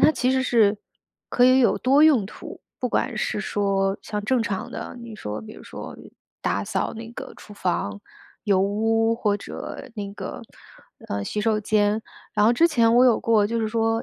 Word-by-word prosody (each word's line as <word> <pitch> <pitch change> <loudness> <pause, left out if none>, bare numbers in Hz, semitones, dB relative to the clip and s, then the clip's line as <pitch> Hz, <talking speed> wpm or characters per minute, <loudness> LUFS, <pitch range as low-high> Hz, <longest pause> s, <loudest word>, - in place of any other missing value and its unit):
它 - - +7
其 255 -2 +1
实 260 0 +2
是 215 -5 +3 0.5
可 245 - +3
以 255 +1 +6
有 240 - +3
多 275 +3 +4
用 285 -10 +5
途。 - - -10 0.2
不 250 - -1
管 240 0 -1
是 210 - -1
说 195 -1 0
像 210 -1 -4
正 250 0 +2
常 200 -4 -3
的， - - -7
比 235 - -9
如 215 - -9
说 105 - -5
比 215 - -10
如 - - -13
说 - - -9 0.5
打 - - 0
扫 - - -2
那 225 +1 -8
个 - - -8
厨 210 - -13
房 135 - -2 0.4
油 200 -3 +3
污， 225 +3 +2
或 210 -3 0
者 205 - -8
那 200 -1 -4
个， - - -6 0.7
呃， 100 0 -2
洗 210 - -3
手 215 -1 +1
间， 210 +1 +1 0.3
然 210 - +3
后 235 - +5
之 335 +6 +5
前 235 -7 +3
我 250 - +7
有 245 -3 +4
过， 215 -3 +3
就 230 +1 -1
是 220 - 0
说， 225 0 0
220 Hz, 215 characters per minute, -24 LUFS, 205-235 Hz, 0.7 s, 它